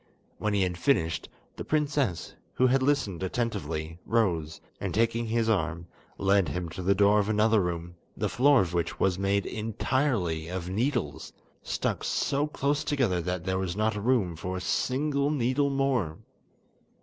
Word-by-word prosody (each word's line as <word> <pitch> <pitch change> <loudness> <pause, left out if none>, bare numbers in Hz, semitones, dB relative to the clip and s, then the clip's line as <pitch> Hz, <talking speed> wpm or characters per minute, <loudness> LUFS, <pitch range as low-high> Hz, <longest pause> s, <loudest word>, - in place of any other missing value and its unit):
When 105 -1 0
he 100 - +3
had 90 -1 -2
finished, 85 - +1 0.3
the - - -4
princess, 145 - 0 0.2
who 130 - +3
had 130 +1 +3
listened 130 - 0
attentively, 85 -7 -3
rose, 85 -9 0 0.2
and - - -3
taking 115 +1 +1
his 115 0 +1
arm, 85 -6 0 0.3
led 100 -1 +3
him 90 -1 -3
to 85 - -7
the 95 +2 +2
door 100 +1 +5
of 105 0 0
another 110 0 +3
room, 85 -1 -3 0.2
the - - 0
floor 135 +1 +4
of 90 -2 -2
which 85 -1 -1
was 95 -1 +1
made 100 0 +1
entirely 110 - -1
of 90 0 -4
needles, 110 - -2 0.3
stuck - - -2
so 145 +2 0
close 145 0 -1
together 130 - +1
that 90 0 -3
there 95 0 -1
was 95 -2 -2
not 110 +1 +1
room 105 -5 +1
for 90 +3 -4
a - - -5
single 140 +9 0
needle 140 0 +1
more. 130 - 0
105 Hz, 160 wpm, -28 LUFS, 90-130 Hz, 0.3 s, door